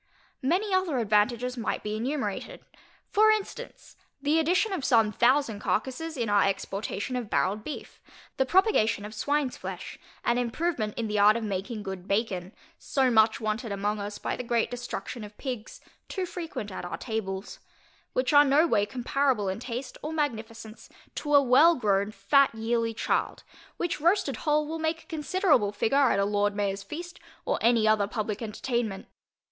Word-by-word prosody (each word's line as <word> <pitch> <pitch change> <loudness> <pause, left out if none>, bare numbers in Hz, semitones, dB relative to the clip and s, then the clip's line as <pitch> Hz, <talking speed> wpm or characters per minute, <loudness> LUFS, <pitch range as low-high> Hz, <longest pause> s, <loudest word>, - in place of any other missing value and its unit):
Many 375 +9 +1
other 375 -7 +1
advantages 235 +3 +1
might 225 - -2
be 210 0 -3
enumerated. 280 - -3 0.5
For 430 +1 +5
instance, 430 -2 -3 0.2
the 295 +3 +2
addition 365 +6 +2
of 355 - -3
some 225 -5 +4
thousand 240 0 +2
carcasses 260 - -2
in 235 -2 -1
our 205 -1 +4
exportation 195 +4 -2
of 240 -4 -3
barrelŌĆÖd 210 +3 0
beef: 300 - -8 0.4
the 265 - +2
propagation 360 - +3
of 210 - -7
swineŌĆÖs 285 +4 -1
flesh, - - -7 0.3
and 240 +1 +2
improvement 245 -2 -2
in 230 -2 -1
the 210 -1 -1
art 210 +2 +6
of 230 - -4
making 210 +2 -3
good 190 -2 -6
bacon, 195 -3 -1 0.3
so 265 -2 +1
much 220 -1 +4
wanted 220 +1 -2
among 205 +1 -1
us 205 0 -5
by - - -3
the - - -5
great 235 -1 0
destruction 245 -2 -5
of 210 0 -11
pigs, 250 -6 -6 0.3
too 380 -2 -2
frequent 330 - -6
at 185 - -6
our 175 - -5
tables; 195 -4 -4 0.5
which - - 0
are 290 0 +8
no 290 +3 +4
way 205 -10 +2
comparable 250 -3 0
in 190 - -3
taste 250 +2 -6
or 305 - -4
magnificence 230 -7 -4 0.2
to 295 -1 0
a 285 - +8
well 290 +7 +6
grown, 200 -5 +1
fat 260 +7 +3
yearling 230 0 -1
child, - - -1 0.3
which 345 -3 -2
roasted 345 -4 +2
whole 300 0 +1
will 325 +1 -4
make 320 +1 -1
a 365 - -13
considerable 300 - +2
figure 265 +6 +2
at - - +2
a 200 - +2
Lord 205 0 +1
MayorŌĆÖs 200 -1 -2
feast, 340 - -7 0.3
or - - 0
any 230 -1 +4
other 215 -2 +3
publick 215 -1 -3
entertainment. 225 -2 -3
235 Hz, 170 wpm, -27 LUFS, 210-290 Hz, 0.5 s, are